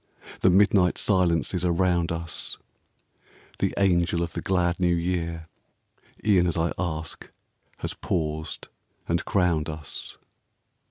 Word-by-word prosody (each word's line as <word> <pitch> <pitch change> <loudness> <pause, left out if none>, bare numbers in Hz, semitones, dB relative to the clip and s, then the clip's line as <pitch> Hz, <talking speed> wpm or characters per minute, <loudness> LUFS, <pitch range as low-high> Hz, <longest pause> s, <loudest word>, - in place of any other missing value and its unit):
The 95 - +4
midnight 95 -1 +4
silences 90 -2 +2
are 90 - +2
round 85 -1 +2
us; 85 -2 -5 1.0
The - - +1
Angel 85 -3 +2
of 85 - -5
the - - -3
glad 90 -2 +1
New 90 -1 +3
Year 85 -1 -2 0.8
E'en 95 -4 +4
as 85 - -1
I 80 0 +1
ask 80 -3 -4 0.5
has - - -4
paused 80 -2 -3 0.4
and 85 0 0
crowned 85 -5 +1
us. 75 -1 -7
85 Hz, 120 wpm, -26 LUFS, 85-90 Hz, 1.0 s, The